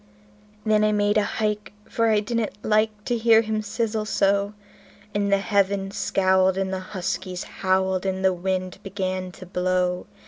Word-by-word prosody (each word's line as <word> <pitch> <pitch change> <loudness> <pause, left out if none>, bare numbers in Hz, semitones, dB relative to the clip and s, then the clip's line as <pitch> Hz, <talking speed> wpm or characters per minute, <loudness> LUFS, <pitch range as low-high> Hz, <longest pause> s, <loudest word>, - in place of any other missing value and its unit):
Then 215 -1 +3
I 215 - +3
made 205 0 +2
a - - +5
hike, 210 -2 -2
for 230 -1 +1
I 215 -1 +3
didn't 230 0 -2
like 215 -1 +1
to 240 - 0
hear 225 -1 +5
him 215 0 -1
sizzle 215 0 -2
so; 200 0 +1 0.6
And 200 -1 0
the 200 - +5
heavens 200 -1 0
scowled, 190 0 +2
and 190 0 -1
the 190 - -2
huskies 185 -1 -4
howled, 190 -1 0
and 190 0 -1
the 190 - +4
wind 185 +1 -3
began 185 -1 -3
to 185 - -11
blow. 180 0 0
200 Hz, 165 wpm, -24 LUFS, 185-215 Hz, 0.6 s, a